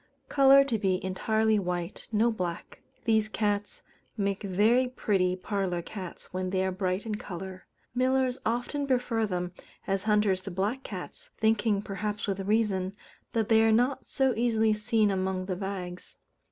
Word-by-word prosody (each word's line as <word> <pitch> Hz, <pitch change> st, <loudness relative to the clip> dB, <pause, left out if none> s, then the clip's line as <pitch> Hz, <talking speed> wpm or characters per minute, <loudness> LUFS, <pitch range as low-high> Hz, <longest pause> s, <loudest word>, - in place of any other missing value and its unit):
_ -, -, -39 dB
Colour 275 Hz, 0 st, +7 dB
to 240 Hz, -6 st, -1 dB
be 190 Hz, -3 st, +1 dB
entirely 220 Hz, +3 st, +1 dB
white: 175 Hz, -2 st, -4 dB
no 225 Hz, +2 st, +3 dB
black. 180 Hz, -6 st, -5 dB, 0.2 s
These 220 Hz, -1 st, +3 dB
cats 205 Hz, -1 st, -1 dB, 0.3 s
make 200 Hz, -1 st, -1 dB
very 215 Hz, +6 st, +3 dB
pretty 195 Hz, -7 st, +1 dB
parlour 185 Hz, -2 st, -2 dB
cats 185 Hz, -2 st, -8 dB
when 185 Hz, 0 st, -2 dB
they 190 Hz, 0 st, +1 dB
are 190 Hz, -, 0 dB
bright 185 Hz, +1 st, -1 dB
in 220 Hz, -, -3 dB
colour. 190 Hz, -2 st, -7 dB, 0.3 s
Millers 255 Hz, 0 st, +1 dB
often 245 Hz, +5 st, -1 dB
prefer 245 Hz, -4 st, +1 dB
them 180 Hz, -2 st, -2 dB, 0.3 s
as 195 Hz, 0 st, 0 dB
hunters 210 Hz, -3 st, +3 dB
to 195 Hz, -, -6 dB
black 200 Hz, +8 st, -1 dB
cats, -, -, -8 dB
thinking, 220 Hz, -2 st, +2 dB
perhaps 205 Hz, +1 st, -3 dB
with 195 Hz, -1 st, -2 dB
reason, 195 Hz, -2 st, 0 dB, 0.4 s
that 225 Hz, -2 st, +1 dB
they 220 Hz, -1 st, +5 dB
are 225 Hz, 0 st, +4 dB
not 245 Hz, +5 st, +2 dB
so 265 Hz, -2 st, +2 dB
easily 225 Hz, -1 st, +2 dB
seen 215 Hz, 0 st, +2 dB
among 185 Hz, -1 st, -1 dB
the 185 Hz, -1 st, -2 dB
bags. 180 Hz, -2 st, -6 dB
210 Hz, 160 wpm, -28 LUFS, 190-225 Hz, 0.4 s, Colour